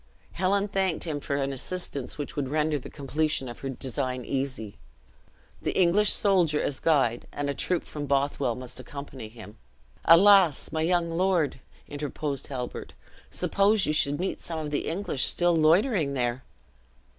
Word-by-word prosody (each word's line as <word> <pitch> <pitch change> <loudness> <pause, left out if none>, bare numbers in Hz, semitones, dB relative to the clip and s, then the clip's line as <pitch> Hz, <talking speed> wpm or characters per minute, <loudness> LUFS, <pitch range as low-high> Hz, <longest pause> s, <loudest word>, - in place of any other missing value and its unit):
Helen 195 +3 +1
thanked 190 -4 0
him 155 -4 -3
for 140 - -3
an 140 0 -1
assistance 140 -1 -5
which 145 - -5
would 140 -3 -2
render 150 0 0
the - - -10
completion 145 -1 -1
of 120 - -8
her 135 - -4
design 130 -1 -3
easy. 130 -6 -4 0.8
The - - -1
English 190 +4 +4
soldier 175 -7 +3
as 140 - -2
guide, 135 -7 +1
and 145 0 -2
a - - -3
troop 180 +4 0
from 145 -1 -6
Bothwell, 140 -3 0
must 125 +1 -8
accompany 135 -4 -8
him. 110 -2 -12 0.5
"Alas! 185 -3 +6
my 160 - -1
young 170 0 +1
lord," 170 -5 +1 0.3
interposed 145 -1 -4
Halbert, 125 -3 -6 0.4
"suppose 200 +1 +2
you 150 - 0
should 145 -1 +1
meet 185 - -2
some 165 - -5
of 155 -2 -4
the 145 - -1
English 165 -5 -1
still 175 -1 +2
loitering 160 - +3
there?" 120 0 -1
150 Hz, 155 wpm, -27 LUFS, 135-175 Hz, 0.8 s, Alas